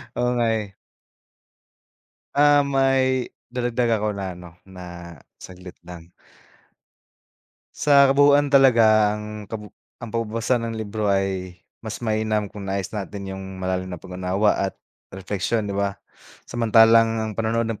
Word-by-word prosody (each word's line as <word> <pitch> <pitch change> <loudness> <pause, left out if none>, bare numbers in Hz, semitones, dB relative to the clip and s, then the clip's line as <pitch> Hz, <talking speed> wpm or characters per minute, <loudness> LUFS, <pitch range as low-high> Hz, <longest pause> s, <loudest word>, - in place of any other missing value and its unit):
Oo, 125 0 0
nga 120 -1 +1
eh. 100 -2 -9 1.6
Um, 145 -1 +4
may 130 -1 +2 0.2
dadagdag 120 -2 0
ako 105 -1 -2
na 95 -2 -4
ano, 90 -1 -11
na 85 -4 -11 0.2
saglit 90 0 -12
lang 85 -1 -12 1.6
Sa 140 -2 +5
kabuuan 145 0 +4
talaga 110 -6 +5
ang 105 -1 -8
kabu 105 -2 -8 0.3
ang 115 - -7
pagbabasa 115 +2 -1
ng 115 -1 -4
libro 110 -1 -3
ay 95 -2 -1 0.2
mas 115 +1 -7
mainam 110 -2 -1
kung 100 -3 -8
nais 95 0 -3
natin 100 -2 -6
yung 95 0 -7 0.2
malalim 95 0 -2
na 90 - -6
pag-unawa 95 +3 0
at 95 0 -1 0.3
repleksiyon 100 +2 -3
di - - -4
ba, 100 0 -1 0.5
samantalang 115 -1 +4
ang 110 0 -2
panonood 115 0 -1
ng 115 -2 -4
105 Hz, 130 wpm, -23 LUFS, 95-115 Hz, 1.6 s, Sa